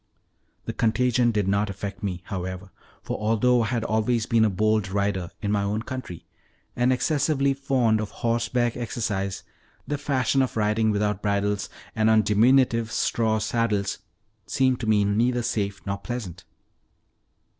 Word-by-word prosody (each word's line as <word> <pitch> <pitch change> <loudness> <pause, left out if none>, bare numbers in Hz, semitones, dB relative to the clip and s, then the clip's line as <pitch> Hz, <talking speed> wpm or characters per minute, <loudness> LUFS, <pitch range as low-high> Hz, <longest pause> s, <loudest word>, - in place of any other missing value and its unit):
The - - -4
contagion 120 +2 +2
did 105 -4 0
not 100 +1 +1
affect 100 -1 -6
me, 90 -4 -3
however, 95 0 -5 0.3
for, - - -4
although 115 +3 +3
I 110 - 0
had 115 0 -1
always 110 +1 0
been 115 -2 +3
a 110 - +4
bold 105 +1 +1
rider 100 -3 -1
(in 100 - 0
my 105 -1 +1
own 105 +2 -1
country), 130 -9 -7 0.5
and 125 +1 +2
excessively 140 +1 +1
fond 130 -5 +1
of 105 - -4
horseback 115 +1 0
exercise, 105 -5 -3 0.4
their 145 +1 -3
fashion 135 -2 +1
of 130 -3 -2
riding 110 +1 +2
without 105 -1 0
bridles, 100 -1 0 0.3
and 110 0 +3
on 110 -1 +5
diminutive 115 +2 +3
straw 110 -2 +1
saddles, 105 -3 -1 0.5
seemed 130 -2 +1
to 115 - -4
me 105 -2 +3
neither 120 +4 +1
safe 100 -3 -2
nor 100 0 -3
pleasant. 95 -9 -6
110 Hz, 150 wpm, -25 LUFS, 100-120 Hz, 0.5 s, on